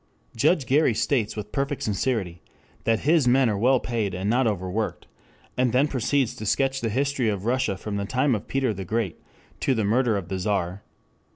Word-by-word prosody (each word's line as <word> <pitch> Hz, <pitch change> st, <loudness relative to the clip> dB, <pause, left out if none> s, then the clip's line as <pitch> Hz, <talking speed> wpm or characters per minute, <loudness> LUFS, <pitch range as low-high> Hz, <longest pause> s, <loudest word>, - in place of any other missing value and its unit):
Judge 150 Hz, +4 st, +2 dB
Gary 135 Hz, -2 st, +3 dB
states 115 Hz, -1 st, 0 dB
with 105 Hz, -1 st, -6 dB
perfect 140 Hz, 0 st, -2 dB
sincerity 100 Hz, -5 st, -1 dB, 0.4 s
that 115 Hz, -1 st, +2 dB
his 155 Hz, -3 st, +3 dB
men 130 Hz, +1 st, +4 dB
are 100 Hz, -, -1 dB
well 130 Hz, +3 st, +4 dB
paid 110 Hz, -7 st, -2 dB
and 95 Hz, +2 st, -3 dB
not 120 Hz, +3 st, +2 dB
overworked, 100 Hz, +1 st, -2 dB, 0.5 s
and 125 Hz, -2 st, +1 dB
then 135 Hz, +4 st, +4 dB
proceeds 135 Hz, -1 st, 0 dB
to -, -, -8 dB
sketch 135 Hz, +5 st, +1 dB
the 115 Hz, -, -1 dB
history 135 Hz, 0 st, 0 dB
of 100 Hz, -1 st, -3 dB
Russia 120 Hz, -5 st, 0 dB
from 100 Hz, +1 st, -4 dB
the 100 Hz, -, -2 dB
time 130 Hz, +5 st, +1 dB
of 105 Hz, -, -3 dB
Peter 135 Hz, -4 st, 0 dB
the 95 Hz, -1 st, -6 dB
Great 105 Hz, -2 st, -2 dB, 0.4 s
to 135 Hz, -, +1 dB
the 110 Hz, -, 0 dB
murder 115 Hz, +1 st, +2 dB
of 95 Hz, -4 st, -5 dB
the 95 Hz, +1 st, -3 dB
Czar. 95 Hz, -1 st, -1 dB
115 Hz, 195 wpm, -25 LUFS, 100-130 Hz, 0.5 s, men